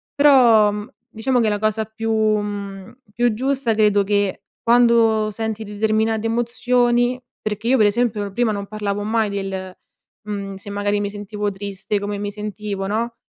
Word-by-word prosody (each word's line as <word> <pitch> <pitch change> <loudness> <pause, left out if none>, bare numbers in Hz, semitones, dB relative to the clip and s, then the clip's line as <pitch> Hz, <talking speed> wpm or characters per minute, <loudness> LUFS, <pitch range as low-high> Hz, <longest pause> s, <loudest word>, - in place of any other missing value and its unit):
però, 245 -8 +6
mhmm, 210 +1 -6 0.2
diciamo 245 +3 0
che, 220 - +2
la 205 -1 -1
cosa 215 +1 0
più 225 +1 -4
mhmm, 205 -1 -2
più 240 0 +2
giusta, 260 0 0
credo 210 -2 +3
che 205 -1 0 0.2
quando 230 -2 +4
senti 220 +1 -4
determinate 220 +1 0
emozioni 245 +1 +1 0.2
perché 215 +1 -3
io 265 - +5
per 215 - +5
esempio, 210 -2 0
prima 230 +2 +1
non 200 -1 -5
parlavo 205 -1 -3
mai 220 0 +1
del 190 -2 -4 0.5
mhmm, 200 -2 -5
se 190 +1 -10
magari, 205 0 0
mi 205 - -2
sentivo 205 0 -4
triste 200 +1 -4
come 205 0 -3
mi 205 0 -3
sentivo, 210 -1 -5
no, 230 +3 -2
215 Hz, 160 wpm, -21 LUFS, 205-230 Hz, 0.5 s, però